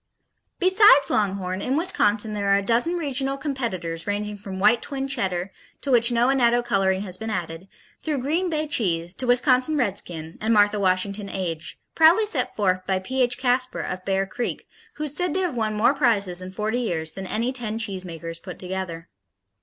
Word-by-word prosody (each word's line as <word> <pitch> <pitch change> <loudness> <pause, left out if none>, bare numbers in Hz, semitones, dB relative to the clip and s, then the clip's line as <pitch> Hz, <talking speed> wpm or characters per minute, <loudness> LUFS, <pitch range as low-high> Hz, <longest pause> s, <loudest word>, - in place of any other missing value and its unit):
Besides 370 -7 +5
Longhorn, 195 -2 -1
in 265 +3 0
Wisconsin 220 - +2
there 200 -1 -1
are 200 - +5
a 200 - -1
dozen 240 - +1
regional 275 -4 -1
competitors 205 - -3
ranging 210 +1 -2
from 195 -2 -8
White 215 +5 +4
Twin 270 -1 -4
Cheddar, 190 -8 -2 0.3
to 280 - -3
which 235 -1 +5
no 240 +1 +3
annatto 240 -2 +3
coloring 195 -5 +1
has 185 -2 -7
been 220 0 -4
added, 175 -3 -4 0.3
through 305 -2 -2
Green 320 +8 0
Bay 310 -1 -1
cheese 175 - -1
to 255 - -4
Wisconsin 255 +4 +3
Redskin 175 - -3
and 220 +1 +2
Martha 205 0 +4
Washington 200 +2 0
Aged, 170 -5 -4 0.2
proudly 335 +7 +5
set 425 - -1
forth 185 -3 +1
by 190 - +1
P.H. 250 +5 0
Kasper 255 0 0
of 185 0 -5
Bear 195 0 0
Creek, 240 +5 -4 0.3
who 300 - -5
is 295 -1 -4
said 355 0 0
to 380 - +1
have 355 -7 -1
"won 215 -2 -1
more 220 +6 +3
prizes 205 -10 +2
in 185 0 -7
forty 215 +5 -1
years 160 -9 -2
than 190 -1 -7
any 235 +6 -1
ten 225 -4 -4
cheesemakers 180 -6 -5
put 180 - -9
together." 180 -2 -5
215 Hz, 185 wpm, -24 LUFS, 190-260 Hz, 0.3 s, Besides